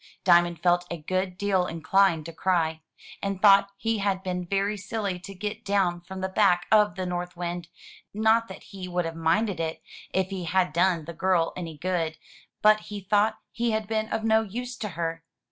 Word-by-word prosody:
Diamond 175 Hz, -2 st, +4 dB
felt 175 Hz, 0 st, +3 dB
a 170 Hz, -, -4 dB
good 185 Hz, +3 st, -2 dB
deal 190 Hz, -2 st, +1 dB
inclined 165 Hz, 0 st, +2 dB
to 165 Hz, -, -7 dB
cry, 160 Hz, -2 st, 0 dB, 0.4 s
and 195 Hz, -1 st, -2 dB
thought 200 Hz, -1 st, +6 dB
he 225 Hz, 0 st, -1 dB
had 195 Hz, -1 st, 0 dB
been 180 Hz, -1 st, -3 dB
very 200 Hz, +2 st, 0 dB
silly 200 Hz, -2 st, -3 dB
to 195 Hz, +2 st, -10 dB
get 210 Hz, +4 st, -5 dB
down 190 Hz, -4 st, +1 dB
from 190 Hz, +2 st, -8 dB
the 190 Hz, -, 0 dB
back 185 Hz, -2 st, +3 dB
of 210 Hz, -1 st, +5 dB
the 185 Hz, -1 st, -3 dB
North 180 Hz, 0 st, -4 dB
Wind; 175 Hz, -1 st, -4 dB, 0.4 s
not 220 Hz, +2 st, +3 dB
that -, -, -10 dB
he 190 Hz, -2 st, -8 dB
would 180 Hz, -1 st, -1 dB
have 165 Hz, 0 st, -4 dB
minded 175 Hz, +4 st, +1 dB
it 160 Hz, -1 st, -2 dB, 0.3 s
if 190 Hz, 0 st, 0 dB
he 185 Hz, -2 st, -4 dB
had 180 Hz, -1 st, +1 dB
done 175 Hz, -2 st, +2 dB
the 170 Hz, -, -7 dB
girl 170 Hz, -1 st, +1 dB
any 165 Hz, -4 st, -6 dB
good; 165 Hz, -1 st, -1 dB, 0.5 s
but 215 Hz, 0 st, +6 dB
he 210 Hz, -1 st, -7 dB
thought 210 Hz, +3 st, +2 dB
he 235 Hz, 0 st, -1 dB
had 215 Hz, -1 st, -1 dB
been 220 Hz, 0 st, -1 dB
of 220 Hz, -, -1 dB
no 220 Hz, 0 st, +4 dB
use 245 Hz, +4 st, -5 dB
to 215 Hz, -3 st, -4 dB
her. 165 Hz, -1 st, -3 dB
185 Hz, 195 wpm, -26 LUFS, 175-205 Hz, 0.5 s, thought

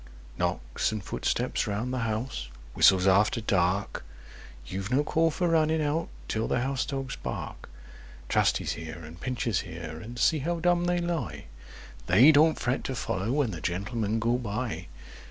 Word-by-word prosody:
Knocks 60 Hz, -, -1 dB
and 110 Hz, -2 st, -4 dB
footsteps -, -, -1 dB
round 105 Hz, +5 st, -2 dB
the 130 Hz, -, -1 dB
house—whistles 90 Hz, -, +1 dB
after 100 Hz, +5 st, +4 dB
dark— 100 Hz, -2 st, 0 dB, 0.6 s
You've 95 Hz, +8 st, -4 dB
no 135 Hz, +4 st, +3 dB
call 165 Hz, +2 st, +2 dB
for 175 Hz, +3 st, -1 dB
running 160 Hz, -1 st, +3 dB
out 155 Hz, +2 st, 0 dB, 0.2 s
till 110 Hz, +1 st, -1 dB
the 120 Hz, -, +1 dB
house 135 Hz, +1 st, -1 dB
dogs 135 Hz, -2 st, -3 dB
bark. -, -, -6 dB, 0.6 s
Trusty's -, -, +2 dB
here, 80 Hz, 0 st, -6 dB
and 80 Hz, +3 st, -12 dB
Pincher's 120 Hz, -6 st, -1 dB
here, 80 Hz, -4 st, -7 dB
and 120 Hz, +4 st, -9 dB
see 135 Hz, +7 st, +3 dB
how 170 Hz, +4 st, -1 dB
dumb 175 Hz, +1 st, +2 dB
they 175 Hz, 0 st, +1 dB
lie— 165 Hz, -, -3 dB, 0.6 s
They 120 Hz, -, +7 dB
don't 155 Hz, +1 st, +4 dB
fret 125 Hz, +1 st, -1 dB
to 130 Hz, -, -2 dB
follow 100 Hz, -2 st, -2 dB
when 140 Hz, -4 st, +1 dB
the 85 Hz, -4 st, -6 dB
Gentlemen 100 Hz, -, -1 dB
go 120 Hz, +2 st, +1 dB
by! 115 Hz, -, -3 dB
115 Hz, 155 wpm, -28 LUFS, 95-145 Hz, 0.6 s, They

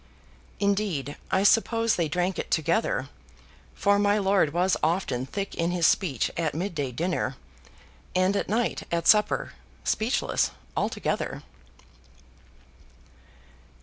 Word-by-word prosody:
Indeed, 195 Hz, -, 0 dB
I 190 Hz, -, +2 dB
suppose 225 Hz, +2 st, +3 dB
they 170 Hz, -2 st, 0 dB
drank 180 Hz, +4 st, -1 dB
it -, -, -4 dB
together; 160 Hz, -, 0 dB, 0.7 s
for 200 Hz, 0 st, +3 dB
my 205 Hz, 0 st, +3 dB
lord 195 Hz, -6 st, +2 dB
was 180 Hz, +4 st, +2 dB
often 155 Hz, -6 st, 0 dB
thick 200 Hz, +6 st, -4 dB
in 165 Hz, 0 st, -1 dB
his 175 Hz, -2 st, +1 dB
speech 160 Hz, -, +2 dB
at 160 Hz, -3 st, -1 dB
mid 180 Hz, +4 st, -2 dB
day 145 Hz, -5 st, -2 dB
dinner; 155 Hz, -2 st, -2 dB, 0.8 s
and 185 Hz, +2 st, +2 dB
at -, -, -1 dB
night 230 Hz, +3 st, 0 dB
at 170 Hz, -1 st, -1 dB
supper, 210 Hz, -1 st, +3 dB, 0.3 s
speechless 220 Hz, +4 st, 0 dB, 0.3 s
altogether. -, -, -2 dB
185 Hz, 115 wpm, -26 LUFS, 160-205 Hz, 0.8 s, suppose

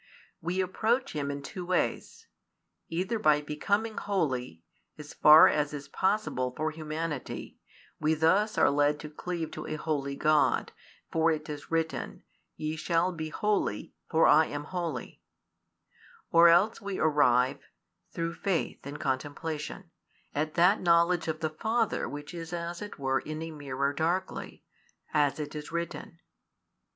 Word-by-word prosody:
We 180 Hz, +3 st, -1 dB
approach 230 Hz, +8 st, 0 dB
Him 145 Hz, -2 st, -2 dB
in 140 Hz, 0 st, -5 dB
two 180 Hz, +6 st, -6 dB
ways: 180 Hz, 0 st, -2 dB, 0.6 s
either 185 Hz, +7 st, -1 dB
by 150 Hz, -5 st, +4 dB
becoming 200 Hz, +9 st, -1 dB
holy, 130 Hz, -, -2 dB, 0.3 s
as 150 Hz, -1 st, -10 dB
far 155 Hz, +1 st, +8 dB
as 150 Hz, 0 st, 0 dB
is 145 Hz, -1 st, -7 dB
possible 130 Hz, -11 st, 0 dB
for 155 Hz, +1 st, -1 dB
humanity, 155 Hz, -2 st, -5 dB, 0.4 s
we 155 Hz, +1 st, +2 dB
thus 185 Hz, +8 st, +2 dB
are -, -, +5 dB
led 145 Hz, +1 st, +2 dB
to 150 Hz, -, -8 dB
cleave 165 Hz, +1 st, -4 dB
to -, -, -7 dB
a 155 Hz, -, -3 dB
holy 145 Hz, -3 st, -2 dB
God, 155 Hz, +1 st, +2 dB, 0.4 s
for 165 Hz, 0 st, +3 dB
it 155 Hz, -1 st, -1 dB
is 145 Hz, -1 st, -7 dB
written: 165 Hz, -1 st, -2 dB, 0.3 s
Ye 155 Hz, +1 st, -3 dB
shall 170 Hz, +3 st, +1 dB
be 160 Hz, -3 st, -5 dB
holy, 205 Hz, -, -1 dB, 0.2 s
for 160 Hz, 0 st, +4 dB
I 155 Hz, +1 st, +6 dB
am 145 Hz, 0 st, -5 dB
holy; 175 Hz, 0 st, -5 dB, 1.1 s
or 170 Hz, 0 st, +8 dB
else 190 Hz, +7 st, +4 dB
we 200 Hz, -1 st, -4 dB
arrive, 135 Hz, -5 st, +3 dB, 0.5 s
through 165 Hz, 0 st, -3 dB
faith 185 Hz, -7 st, -2 dB
and 145 Hz, +1 st, -7 dB
contemplation, 150 Hz, +6 st, -4 dB, 0.4 s
at 155 Hz, +1 st, -2 dB
that 180 Hz, +5 st, +4 dB
knowledge 170 Hz, -1 st, +3 dB
of 160 Hz, 0 st, -3 dB
the 155 Hz, -1 st, -1 dB
Father 220 Hz, +7 st, 0 dB
which 145 Hz, +3 st, -7 dB
is 165 Hz, 0 st, -7 dB
as 170 Hz, 0 st, -4 dB
it 210 Hz, -, -7 dB
were 135 Hz, -1 st, 0 dB
in 155 Hz, 0 st, -6 dB
a 165 Hz, -, -6 dB
mirror 140 Hz, -2 st, -2 dB
darkly, 175 Hz, +5 st, -2 dB, 0.5 s
as 145 Hz, 0 st, +2 dB
it 150 Hz, -1 st, -5 dB
is 150 Hz, -1 st, -7 dB
written. 170 Hz, 0 st, -5 dB
160 Hz, 145 wpm, -29 LUFS, 150-175 Hz, 1.1 s, far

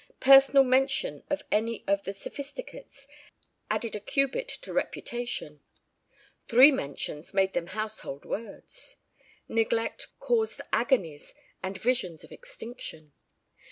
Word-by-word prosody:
Personal 275 Hz, +1 st, +8 dB
mention 260 Hz, -, +1 dB
of 290 Hz, -, -1 dB
any 225 Hz, +2 st, 0 dB
of 200 Hz, 0 st, +1 dB
the 195 Hz, -, -3 dB
Sophisticates 285 Hz, -, -9 dB, 0.6 s
added 230 Hz, -2 st, -1 dB
a -, -, -3 dB
cubit 275 Hz, -, 0 dB
to -, -, -8 dB
reputation. 240 Hz, -11 st, -3 dB, 0.9 s
Three 260 Hz, +5 st, +8 dB
mentions 150 Hz, -, -5 dB
made 190 Hz, -1 st, +3 dB
them 170 Hz, -, -1 dB
household 215 Hz, -8 st, -4 dB
words. 230 Hz, -, -7 dB, 0.5 s
Neglect 225 Hz, 0 st, 0 dB
caused 450 Hz, -2 st, +1 dB
agonies 165 Hz, -, 0 dB, 0.3 s
and 190 Hz, 0 st, -4 dB
visions 190 Hz, -8 st, -1 dB
of -, -, -14 dB
extinction. 240 Hz, -, -9 dB
230 Hz, 110 wpm, -28 LUFS, 190-275 Hz, 0.9 s, Personal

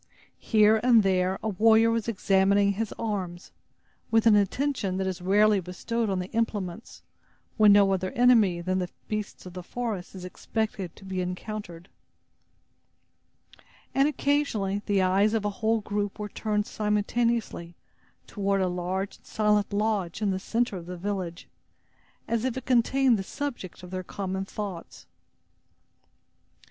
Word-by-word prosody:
Here 215 Hz, 0 st, +4 dB
and 235 Hz, -2 st, +5 dB
there 185 Hz, 0 st, +1 dB
a -, -, -1 dB
warrior 225 Hz, +3 st, +4 dB
was 230 Hz, -1 st, -1 dB
examining 200 Hz, -1 st, +3 dB
his 210 Hz, +1 st, -3 dB
arms, 190 Hz, -5 st, -4 dB, 0.6 s
with 225 Hz, 0 st, +3 dB
an 220 Hz, -2 st, +7 dB
attention 205 Hz, -1 st, 0 dB
that 190 Hz, -, -1 dB
is 185 Hz, -1 st, -3 dB
rarely 205 Hz, +2 st, +4 dB
bestowed 215 Hz, +5 st, -3 dB
on 190 Hz, -, 0 dB
the 180 Hz, +1 st, -5 dB
implements, 215 Hz, -3 st, -3 dB, 0.5 s
when 215 Hz, -2 st, +7 dB
no 200 Hz, -1 st, +5 dB
other 185 Hz, 0 st, -1 dB
enemy 225 Hz, -8 st, +4 dB
than 185 Hz, +2 st, -1 dB
the 180 Hz, -1 st, -3 dB, 0.2 s
beasts 210 Hz, -2 st, -5 dB
of 180 Hz, -, -9 dB
the 180 Hz, -, -6 dB
forest 210 Hz, -2 st, -5 dB
is 185 Hz, -1 st, -8 dB
expected 195 Hz, -1 st, -4 dB
to 195 Hz, -, -15 dB
be 190 Hz, -1 st, -3 dB
encountered. 180 Hz, -1 st, -6 dB, 2.1 s
And 275 Hz, +1 st, +4 dB
occasionally, 280 Hz, -10 st, 0 dB
the 200 Hz, -2 st, +2 dB
eyes 200 Hz, +4 st, +3 dB
of 215 Hz, -2 st, -1 dB
a 205 Hz, -, 0 dB
whole 220 Hz, 0 st, +2 dB
group 205 Hz, -1 st, -3 dB
were 210 Hz, 0 st, -5 dB
turned 210 Hz, -1 st, -1 dB
simultaneously 210 Hz, -4 st, -1 dB, 0.5 s
toward 200 Hz, -1 st, -1 dB
a 190 Hz, -, +1 dB
large 180 Hz, +2 st, -3 dB
and -, -, -32 dB
silent 210 Hz, -1 st, +1 dB
lodge 205 Hz, -4 st, -1 dB
in 210 Hz, -2 st, 0 dB
the 190 Hz, -, -2 dB
center 230 Hz, +1 st, -1 dB
of 170 Hz, -1 st, -9 dB
the 180 Hz, 0 st, -6 dB
village, 185 Hz, -2 st, -4 dB, 0.8 s
as 230 Hz, -1 st, -1 dB
if 260 Hz, -1 st, -1 dB
it 260 Hz, -, -6 dB
contained 255 Hz, -1 st, +3 dB
the -, -, -3 dB
subject 240 Hz, -, -6 dB
of 180 Hz, -, -10 dB
their 185 Hz, 0 st, -3 dB
common 190 Hz, +1 st, -4 dB
thoughts. 195 Hz, -4 st, -7 dB
205 Hz, 150 wpm, -27 LUFS, 185-225 Hz, 2.1 s, an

